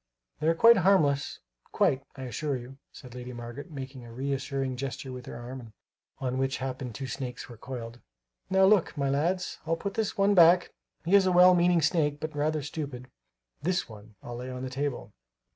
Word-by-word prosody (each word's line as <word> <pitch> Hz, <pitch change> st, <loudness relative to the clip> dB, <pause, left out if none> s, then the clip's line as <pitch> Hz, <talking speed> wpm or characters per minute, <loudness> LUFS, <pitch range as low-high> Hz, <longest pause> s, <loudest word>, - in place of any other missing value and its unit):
"They 155 Hz, -, -1 dB
are 165 Hz, -, +4 dB
quite 230 Hz, +6 st, +7 dB
harmless, 160 Hz, -7 st, +2 dB, 0.3 s
quite, 135 Hz, 0 st, +2 dB
I 135 Hz, -, -7 dB
assure 135 Hz, +2 st, -2 dB
you," 125 Hz, +3 st, -11 dB
said 125 Hz, -2 st, -12 dB
Lady 125 Hz, 0 st, -7 dB
Margaret, 120 Hz, +6 st, -8 dB
making 135 Hz, -3 st, -8 dB
a 120 Hz, -, -11 dB
reassuring 135 Hz, +1 st, -2 dB
gesture 130 Hz, 0 st, -5 dB
with 125 Hz, -1 st, -8 dB
her -, -, -7 dB
arm, 120 Hz, -2 st, -9 dB, 0.4 s
on 130 Hz, 0 st, -2 dB
which 135 Hz, 0 st, 0 dB
it 130 Hz, -, -4 dB
happened 130 Hz, -3 st, -5 dB
two 135 Hz, -, -5 dB
snakes 125 Hz, 0 st, -5 dB
were 120 Hz, -, -11 dB
coiled. 120 Hz, 0 st, -7 dB, 0.5 s
"Now, 190 Hz, 0 st, +5 dB
look, 195 Hz, -5 st, +3 dB
my 140 Hz, -1 st, 0 dB
lads, 175 Hz, +6 st, -1 dB
I'll 165 Hz, +1 st, 0 dB
put 200 Hz, +3 st, -4 dB
this 220 Hz, -2 st, -2 dB
one 200 Hz, +1 st, +4 dB
back; 175 Hz, -1 st, +6 dB, 0.3 s
he 175 Hz, -, 0 dB
is 195 Hz, -2 st, +6 dB
a -, -, +3 dB
well 180 Hz, +1 st, +7 dB
meaning 175 Hz, -2 st, +3 dB
snake 150 Hz, -2 st, +1 dB
but 155 Hz, 0 st, -5 dB
rather 150 Hz, 0 st, 0 dB
stupid. 135 Hz, -4 st, -6 dB, 0.5 s
This 180 Hz, +4 st, 0 dB
one 110 Hz, -1 st, -13 dB
I'll 120 Hz, 0 st, -6 dB
lay 125 Hz, +1 st, -6 dB
on 125 Hz, 0 st, -6 dB
the 130 Hz, -, -5 dB
table." 140 Hz, 0 st, -3 dB
140 Hz, 195 wpm, -28 LUFS, 125-165 Hz, 0.5 s, quite